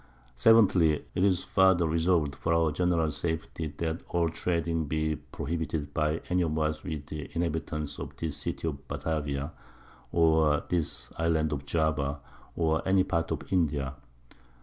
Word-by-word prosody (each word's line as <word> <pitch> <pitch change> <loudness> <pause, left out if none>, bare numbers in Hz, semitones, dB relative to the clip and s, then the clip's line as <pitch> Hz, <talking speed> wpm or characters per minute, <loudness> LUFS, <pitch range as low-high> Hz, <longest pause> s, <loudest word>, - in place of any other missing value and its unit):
_ 115 - +7
7thly, 80 -4 +3
_It's 95 -1 +2
farther 95 -3 +4
resolved 80 -2 +2
for 85 - 0
our 80 -2 +3
general 85 -1 +1
Safety 80 +1 -3
that 80 0 -2
all 85 -1 +1
trading 85 -1 -1
be 80 +1 0
prohibited 80 -2 -4
by 75 +1 0
any 90 +1 +2
of 80 -2 0
us 75 0 -1
with 75 -4 -5
the 75 -1 -6
Inhabitants 75 -3 -2
of - - -7
this 80 -3 -3
City - - -3
of_ 70 -3 -3
Batavia, 75 -1 -2 0.6
or 80 -3 +4
this 85 -4 -2
Island 80 -2 +1
of 70 -1 -5
Java, 75 -3 0 0.4
or 80 -1 +1
any 95 0 +4
part 85 -2 -1
of - - -4
India. 70 -6 +1
80 Hz, 150 wpm, -29 LUFS, 75-85 Hz, 0.6 s, _